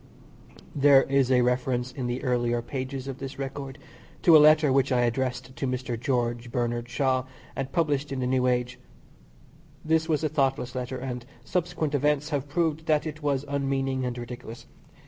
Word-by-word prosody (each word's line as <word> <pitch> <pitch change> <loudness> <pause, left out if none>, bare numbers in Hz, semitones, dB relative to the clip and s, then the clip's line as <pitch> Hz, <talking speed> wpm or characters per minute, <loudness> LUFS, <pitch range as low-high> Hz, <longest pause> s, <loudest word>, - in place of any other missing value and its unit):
There 140 -1 +6
is 135 -2 +2
a 125 -1 +5
reference 125 0 0
in 125 -1 -4
the 120 +2 -3
earlier 120 -2 0
pages 130 +1 -5
of 135 -1 -6
this 135 0 -6
record 135 0 -5 0.5
to 170 - +7
a - - +10
letter 155 -1 +6
which 135 0 +2
I 125 -1 +3
addressed 125 +1 -1
to 135 - -2
Mr. 125 -1 -2
George 120 -1 -1
Bernard 120 -1 -2
Shaw 130 0 +1 0.3
and 135 0 -4
published 145 -4 0
in 135 - -2
the 125 - -1
New 125 0 +2
Age. 125 0 0 1.1
This 160 +1 +1
was 155 -1 +1
a - - +3
thoughtless 135 -4 0
letter, 130 0 -4
and 125 -1 -5 0.2
subsequent 170 -4 -2
events 145 +1 +1
have 145 -1 -2
proved 160 0 -1
that 150 -1 +2
it 155 0 -6
was 145 -1 0
unmeaning 135 -2 -1
and 125 -1 -3
ridiculous. 120 -1 -8
130 Hz, 175 wpm, -27 LUFS, 125-145 Hz, 1.1 s, a